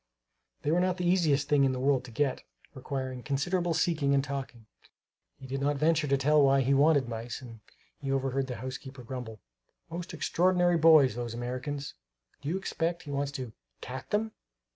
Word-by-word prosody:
They 150 Hz, -, +1 dB
were 170 Hz, -, +3 dB
not 180 Hz, 0 st, +1 dB
the 180 Hz, -1 st, -1 dB
easiest 155 Hz, -6 st, +2 dB
thing 145 Hz, -2 st, +4 dB
in 135 Hz, -1 st, +3 dB
the 130 Hz, -, -3 dB
world 135 Hz, -1 st, +2 dB
to -, -, -10 dB
get, 135 Hz, +3 st, 0 dB, 0.3 s
requiring 130 Hz, -1 st, -4 dB
considerable 170 Hz, +6 st, 0 dB
seeking 150 Hz, -5 st, +2 dB
and 135 Hz, -, +2 dB
talking. 135 Hz, -5 st, -6 dB, 0.7 s
He 135 Hz, -, -12 dB
did 135 Hz, +1 st, -4 dB
not 145 Hz, +1 st, +1 dB
venture 155 Hz, +1 st, +2 dB
to 140 Hz, 0 st, +3 dB
tell 150 Hz, +3 st, +4 dB
why 135 Hz, -1 st, +5 dB
he 135 Hz, +2 st, +2 dB
wanted 140 Hz, -1 st, +4 dB
mice; 115 Hz, 0 st, -5 dB
and 115 Hz, -3 st, -11 dB, 0.4 s
he 135 Hz, -1 st, -3 dB
overheard 135 Hz, 0 st, 0 dB
the 125 Hz, -, -4 dB
housekeeper 130 Hz, +1 st, -7 dB
grumble: 115 Hz, -4 st, -7 dB, 0.5 s
"Most 175 Hz, +2 st, -5 dB
extraordinary 175 Hz, 0 st, +2 dB
boys, 155 Hz, -6 st, +7 dB
those 120 Hz, 0 st, -4 dB
Americans! 130 Hz, +4 st, -4 dB, 0.5 s
Do 145 Hz, -, -4 dB
you 180 Hz, -, 0 dB
expect 170 Hz, -2 st, -2 dB
he 145 Hz, -, -7 dB
wants 140 Hz, 0 st, -1 dB
to 125 Hz, -5 st, -6 dB, 0.3 s
cat 130 Hz, +1 st, -7 dB
them?" 220 Hz, +1 st, 0 dB
140 Hz, 185 wpm, -29 LUFS, 130-160 Hz, 0.7 s, boys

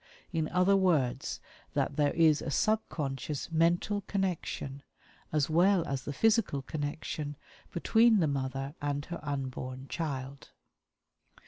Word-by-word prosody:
In 160 Hz, -2 st, 0 dB
other 180 Hz, +2 st, +4 dB
words, 155 Hz, -10 st, +1 dB, 0.4 s
that -, -, 0 dB
there 145 Hz, -1 st, +3 dB
is 160 Hz, -2 st, +5 dB
a -, -, -3 dB
subconscious 150 Hz, -, -1 dB
mental 170 Hz, +5 st, +2 dB
connection, 175 Hz, -8 st, -2 dB, 0.5 s
as 150 Hz, -2 st, +2 dB
well 175 Hz, +2 st, +3 dB
as 135 Hz, -2 st, -3 dB
the -, -, -3 dB
physical 215 Hz, -, +2 dB
connection, 145 Hz, +1 st, -4 dB, 0.4 s
between 225 Hz, +5 st, +4 dB
the 170 Hz, -, +3 dB
mother 135 Hz, -1 st, -2 dB
and 145 Hz, 0 st, -1 dB
her 175 Hz, -, -6 dB
unborn 130 Hz, -2 st, -4 dB
child. 140 Hz, -4 st, -4 dB
150 Hz, 120 wpm, -31 LUFS, 140-175 Hz, 0.5 s, is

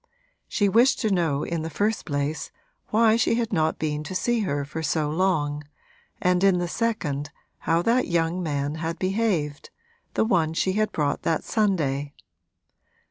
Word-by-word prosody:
She 205 Hz, -, +1 dB
wished 235 Hz, +7 st, +4 dB
to 220 Hz, -4 st, +1 dB
know 160 Hz, -6 st, +1 dB
in 170 Hz, -1 st, -2 dB
the 160 Hz, -, -4 dB
first 205 Hz, +8 st, -1 dB
place 145 Hz, +1 st, -2 dB, 0.4 s
why 220 Hz, 0 st, +4 dB
she 230 Hz, 0 st, +2 dB
had 230 Hz, -2 st, -1 dB
not 160 Hz, -2 st, +1 dB
been 150 Hz, -1 st, -2 dB
to 185 Hz, -, -6 dB
see 240 Hz, +5 st, +1 dB
her 145 Hz, -9 st, -1 dB
for 160 Hz, +3 st, -5 dB
so 150 Hz, -1 st, 0 dB
long, 150 Hz, -4 st, 0 dB, 0.6 s
and 180 Hz, 0 st, +2 dB
in 195 Hz, -2 st, +5 dB
the 175 Hz, 0 st, -1 dB
second 170 Hz, -, -2 dB, 0.4 s
how 165 Hz, +1 st, +3 dB
that 240 Hz, +4 st, +2 dB
young 170 Hz, +1 st, 0 dB
man 145 Hz, -3 st, -2 dB
had 165 Hz, +1 st, -2 dB
behaved 185 Hz, -6 st, -1 dB, 0.5 s
the -, -, +2 dB
one 165 Hz, -7 st, +2 dB
she 190 Hz, +2 st, +1 dB
had 215 Hz, +1 st, +1 dB
brought 150 Hz, -2 st, -1 dB
that 160 Hz, -, 0 dB
Sunday. 145 Hz, -10 st, 0 dB
170 Hz, 165 wpm, -25 LUFS, 150-205 Hz, 0.6 s, in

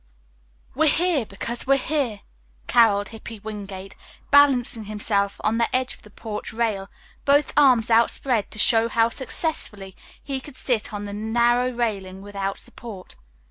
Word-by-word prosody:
"We're 310 Hz, +2 st, +3 dB
here 330 Hz, -, +1 dB
because 235 Hz, +6 st, -3 dB
we're 275 Hz, 0 st, +5 dB
here," 265 Hz, -7 st, -2 dB, 0.5 s
caroled 205 Hz, -4 st, +4 dB
Hippy 225 Hz, 0 st, -9 dB
Wingate, 195 Hz, -3 st, -7 dB, 0.4 s
balancing 260 Hz, -6 st, +4 dB
himself 205 Hz, -1 st, -1 dB
on 220 Hz, +2 st, +1 dB
the 230 Hz, -, +3 dB
edge 255 Hz, 0 st, 0 dB
of -, -, -16 dB
the 210 Hz, -, -16 dB
porch 210 Hz, 0 st, -6 dB
rail, 220 Hz, -4 st, -1 dB, 0.3 s
both 285 Hz, +1 st, +3 dB
arms 250 Hz, -6 st, +4 dB
outspread 230 Hz, 0 st, +2 dB
to -, -, -10 dB
show 225 Hz, +2 st, +4 dB
how 230 Hz, 0 st, +3 dB
successfully 225 Hz, -, -3 dB, 0.2 s
he 270 Hz, -2 st, -5 dB
could 275 Hz, -1 st, -11 dB
sit 240 Hz, -5 st, -1 dB
on 205 Hz, -1 st, -5 dB
the 200 Hz, -, -6 dB
narrow 235 Hz, +4 st, +2 dB
railing 200 Hz, -6 st, -3 dB
without 200 Hz, -1 st, -4 dB
support. 205 Hz, -6 st, -10 dB
225 Hz, 145 wpm, -23 LUFS, 205-255 Hz, 0.5 s, we're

